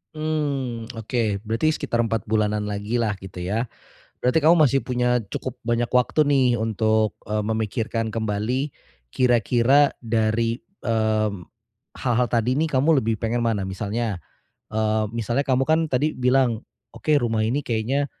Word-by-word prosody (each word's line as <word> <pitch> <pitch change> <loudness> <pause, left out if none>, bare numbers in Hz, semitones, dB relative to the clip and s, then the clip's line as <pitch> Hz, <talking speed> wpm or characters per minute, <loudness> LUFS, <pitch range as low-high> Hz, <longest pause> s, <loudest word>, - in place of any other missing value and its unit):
Mmm, 140 -7 -2
oke 110 -3 -1
berarti 115 +8 +1
sekitar 120 -5 -1
4 115 -3 -2
bulanan 105 -1 0
lagi 105 +3 -2
lah 105 -3 0
gitu 95 -1 -10
ya, 110 +4 0 0.5
berarti 125 +6 +2
kamu 165 +4 +6
masih 135 -4 +4
punya 125 0 +1
cukup 130 - -4
banyak 120 +1 0
waktu 125 +5 +3
nih 140 -3 +3
untuk, 110 -1 +1 0.2
eee, 105 0 -1
memikirkan 110 +1 -1
kembali 115 +6 -2 0.4
kira-kira 125 +3 +3
dari, 115 0 0 0.2
mmm, 110 -5 0 0.6
hal-hal 125 -1 +2
tadi 120 +2 0
nih 160 - +2
kamu 145 +4 +4
lebih 110 -1 -1
pengen 115 +1 0
mana 105 -4 0
misalnya, 105 +2 -2 0.5
eee, 110 0 0
misalnya 115 +3 -1
kamu 135 -1 +1
kan 160 +1 +3
tadi 150 +4 +1
bilang, 125 -2 +2 0.3
oke 155 -1 +1
rumah 115 -4 0
ini 125 +6 0
kayaknya 120 +5 0
115 Hz, 140 wpm, -23 LUFS, 110-130 Hz, 0.6 s, kamu